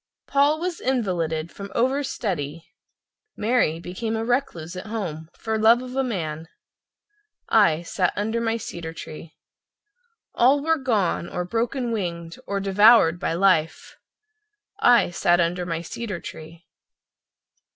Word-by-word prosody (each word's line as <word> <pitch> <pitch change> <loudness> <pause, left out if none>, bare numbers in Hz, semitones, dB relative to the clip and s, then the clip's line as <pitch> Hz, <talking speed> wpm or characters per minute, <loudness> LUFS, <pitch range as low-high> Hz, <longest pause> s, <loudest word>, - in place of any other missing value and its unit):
Paul 285 +2 +2
was 350 0 -3
invalided 175 -10 -1
from 200 0 -9
over 260 +4 +1
study, 165 - -4 0.7
Mary 215 -8 +1
became 220 +6 -4
a 225 0 -2
recluse 185 - -2
at 185 +4 -7
home 170 -8 -5
for 220 -1 -2
love 230 +3 +5
of 255 0 -8
a 270 - +1
man— 165 -9 -4 1.0
I 170 -7 +4
sat 180 +1 0
under 220 +3 -1
my 225 0 0
cedar 170 -6 -7
tree. 155 0 -10 1.0
All 265 +4 +4
were 325 0 +2
gone, 210 -9 0
or 180 - -3
broken 235 +5 -2
winged 170 -6 -4
or 200 0 -1
devoured 195 -3 +5
by 180 - -1
life— 170 -3 +1 0.8
I 240 - +5
sat 175 0 +2
under 175 +1 0
my 165 -1 -2
cedar 205 +1 -5
tree. 160 +1 -10
195 Hz, 130 wpm, -24 LUFS, 170-235 Hz, 1.0 s, love